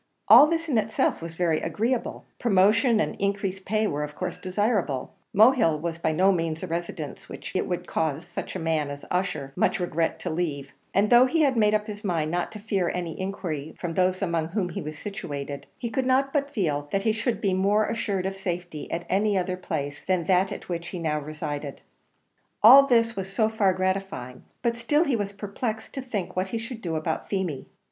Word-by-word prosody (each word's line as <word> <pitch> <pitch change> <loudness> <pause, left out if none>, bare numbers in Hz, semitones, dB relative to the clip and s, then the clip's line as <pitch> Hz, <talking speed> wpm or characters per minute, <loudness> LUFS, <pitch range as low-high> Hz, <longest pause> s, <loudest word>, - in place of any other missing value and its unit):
All 295 - +10
this 330 +1 -1
in 255 -7 +2
itself 215 -4 0
was 165 0 -7
very 165 -2 +1
agreeable; 235 +3 -2
promotion 215 +2 +4
and - - 0
increased 195 -1 -2
pay 215 +2 +1
were 150 -7 -1
of 150 0 -6
course - - -4
desirable; 185 - -1 0.2
Mohill 215 - +5
was 165 +1 -4
by 160 - +1
no 185 +5 +4
means 165 -3 -1
a - - -3
residence 165 -3 -5
which - - -7
it - - 0
would 180 -2 -3
cause 160 0 -1
such - - -6
a - - -2
man 160 -3 0
as 145 0 -7
Ussher 155 -7 -1
much 220 - +1
regret 170 -2 0
to - - -3
leave; 150 -5 -3 0.2
and 205 +3 +2
though 245 +2 +8
he 320 +5 +1
had 270 -3 +3
made 215 -2 +4
up 210 0 0
his 210 0 -7
mind 165 -6 0
not 175 0 -1
to - - -6
fear 200 -4 0
any 175 -2 -3
injury 165 -6 -4
from 175 -2 -3
those 185 +2 +1
among 170 -3 0
whom 185 0 -1
he 165 - -5
was 155 0 -6
situated, 145 -7 -6
he 235 -2 -4
could 260 +2 0
not 270 +1 +2
but 280 -2 +1
feel 150 - -1
that 195 0 0
he 220 - +3
should 225 +2 -1
be 195 -3 +1
more 200 +3 +3
assured 205 -4 -2
of 195 0 -2
safety 175 -4 -5
at 170 +1 -3
any 200 +1 +2
other 185 0 -1
place 145 -5 -4
than 185 -2 +1
that 185 +2 +2
at - - -7
which 170 -1 -4
he 180 - -5
now 155 -3 -1
resided. 150 -1 -5 0.8
All 270 +5 +10
this 230 -2 +3
was 195 0 -4
so 220 +2 +2
far 215 -3 +2
gratifying, 185 -9 -3 0.2
but 235 0 +1
still 295 +7 +2
he 280 -7 +1
was 205 -3 -2
perplexed 215 +2 -5
to 270 - -4
think 220 -8 -4
what 185 +1 0
he 230 - -3
should 230 +1 -6
do 165 -5 -3
about 155 +1 -2
Feemy. 185 -8 -2
190 Hz, 210 wpm, -26 LUFS, 165-215 Hz, 0.8 s, All